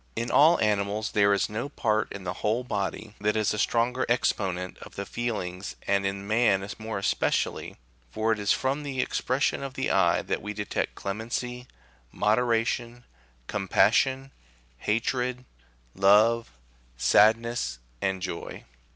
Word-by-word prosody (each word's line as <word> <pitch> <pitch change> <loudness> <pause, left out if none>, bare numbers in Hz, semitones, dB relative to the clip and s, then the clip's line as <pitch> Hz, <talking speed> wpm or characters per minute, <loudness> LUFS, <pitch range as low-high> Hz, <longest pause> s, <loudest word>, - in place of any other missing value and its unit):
In 115 +1 -2
all 160 +4 +6
animals 105 0 0
there 100 -1 +4
is 100 -1 +2
no 110 +6 -4
part 110 -5 0
in 100 - -7
the 90 - -3
whole 110 +4 +1
body 105 -1 -3
that 105 +1 +1
is 110 -1 +1
a 105 - -3
stronger 125 +4 +1
exponent 95 -6 0
of - - -12
the 100 - -4
feelings, 100 -7 -4
and 100 0 +1
in 100 0 -4
man 105 -3 +2
more 110 -1 -4
especially, 100 - -1 0.3
for 110 - 0
it 110 - 0
is 100 0 +1
from 135 +3 0
the 140 -3 -5
expression 130 +2 0
of 135 -1 -6
the 130 - -1
eye 85 -3 +3
that - - -2
we 105 - -5
detect 105 -1 -3
clemency, 120 +4 -4 0.4
moderation, 120 +2 0 0.4
compassion, 130 - +2 0.5
hatred, 125 - -1 0.5
love, 105 +4 +4 0.5
sadness, 110 - +3 0.2
and 95 -1 -1
joy. 90 -3 -5
110 Hz, 140 wpm, -27 LUFS, 100-120 Hz, 0.5 s, all